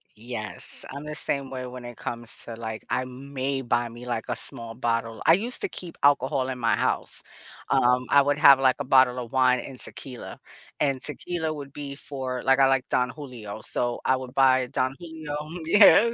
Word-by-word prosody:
Yes. 110 -1 -6
I'm 140 +2 -7
the 150 - -5
same 140 -3 -2
way 130 -1 -5
when 125 -1 -8
it 120 -1 -8
comes 120 -1 -6
to, 115 - -6
like 110 -1 -6
I 130 - 0
may 135 +1 -3
buy 120 -1 0
me, 120 +1 -10
like, 115 -2 -2
a - - 0
small 115 -1 -5
bottle. 115 -2 -2
I 160 - +8
used 230 +8 0
to - - -1
keep 175 -2 -7
alcohol 135 -2 +3
in 130 - -3
my 115 -1 +2
house. - - -1 0.5
Um, 125 +1 +3
I 140 - +7
would 145 +1 +1
have 140 -2 +8
like 130 -1 +3
a - - -1
bottle 130 -1 +5
of 120 -2 -7
wine 130 -1 +4
and 130 -2 -8
tequila. 125 -3 -8 0.4
And 135 -3 +1
tequila 160 +1 -3
would 140 -2 -8
be 140 -1 -6
for 130 -3 -5
like, 135 +1 +4
I 135 - +7
like 135 -1 +1
Don 125 0 +2
Julio. 120 -8 -8
So 120 +1 -2
I 130 - +4
would 130 -1 -7
buy 130 -2 +4
Don 130 0 -1
Julio. 160 -3 -6 0.3
Yeah. 210 +5 +7
130 Hz, 200 wpm, -26 LUFS, 120-140 Hz, 0.5 s, I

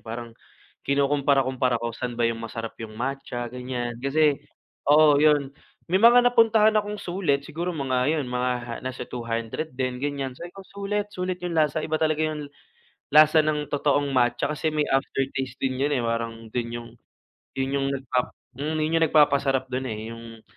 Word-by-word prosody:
parang 115 +1 -7 0.5
kinukumpara-kumpara 135 -3 +1
ko 115 0 -4
saan 120 +1 -5
ba 120 - +1
yung 115 0 0
masarap 115 0 -6
yung 110 -1 -8
matcha 130 -1 -4
ganiyan, 125 -2 -4
kasi 150 +3 +3 0.6
oo 150 -1 +6
yun, 145 -3 +3 0.4
may 190 - +4
mga 240 +2 +7
napuntahan 225 -3 +5
akong 210 0 -5
sulit 175 -8 -1
siguro 165 +4 -4
mga 135 +1 +1
yun 150 - -1
mga 125 -1 -2
nasa 130 0 -5
200 115 +5 -4
din 130 -1 -2
ganiyan 140 -2 -3
sabi 170 +7 -9
ko, 195 - -10
"Sulit, 200 +1 -3
sulit 185 -1 -3
yung 175 - -2
lasa," 155 -1 +1
iba 155 0 -1
talaga 155 0 +1
yung 150 -2 -3 0.6
lasa 155 +1 +6
ng 150 -1 -1
totoong 145 0 +1
matcha 120 -1 +2
kasi 150 +1 -1
may 150 -1 0
aftertaste 135 -1 -1
din 130 -1 -1
yun, 145 - +1
eh, 135 -4 +1
parang 115 0 -3
dun 120 -1 -1
yung 120 0 -6 0.7
yun 135 0 -1
yung 135 - 0
nagpap 130 -2 -1 0.3
hmm 155 +3 -2
yun 155 +2 0
yung 165 - +4
nagpapasarap 140 -3 +3
dun, 130 +1 -2
eh, 110 -1 -5
yung 115 -1 -10
135 Hz, 170 wpm, -25 LUFS, 125-155 Hz, 0.7 s, mga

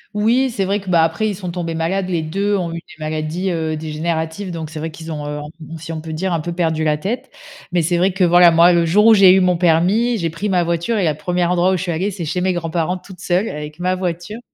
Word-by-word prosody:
Oui, 235 +6 +2
c'est 215 -5 -2
vrai 200 +2 0
que, 195 -2 -9
bah, 170 -2 +4
après, 170 +7 0
ils 205 - -3
sont 180 -2 -6
tombés 170 -2 -4
malades, 180 +4 -1
les 170 -3 -1
2 200 +6 0
ont 175 -3 -3
eu - - -4
des 160 -1 -13
maladies, 155 +4 -2
heu, 160 -2 -2
dégénératives, 160 +4 -3
donc 160 -2 -6
c'est 155 - -6
vrai 160 +2 -3
qu'ils 160 +1 -9
ont, 150 -2 -5
heu, 150 0 -4 0.3
on 165 - -7
si 160 +1 -8
on 160 - -5
peut 160 0 -7
dire, 180 +3 -2
un 165 - 0
peu 170 +3 -4
perdu 165 -2 0
la 150 -1 +1
tête, 205 +11 -4 0.4
mais 175 -1 +1
c'est 175 +2 +1
vrai 185 +3 +2
que, 185 +1 0
voilà, 175 0 +7
moi, 170 +2 +5
le 170 -1 +2
jour 210 +6 +4
où 225 - +8
j'ai 195 -3 +7
eu 190 - +5
mon 180 -1 +3
permis, 180 +8 +2
j'ai 165 -5 -2
pris 200 +6 -3
ma 180 -2 +2
voiture 170 +7 -1
et 200 - +1
la 155 -3 +2
1re 175 +2 -1
endroit 180 +1 +2
où - - +1
je 180 - -4
suis 180 - -2
allée, 175 +5 -1
c'est 185 -4 -5
chez 180 +4 -2
mes 185 0 +1
grands-parents 170 +1 -2
toute 180 -1 -14
seule 180 +3 0
avec 150 +1 -7
ma 180 +1 0
voiture, 185 +3 -4
175 Hz, 280 wpm, -19 LUFS, 160-190 Hz, 0.4 s, où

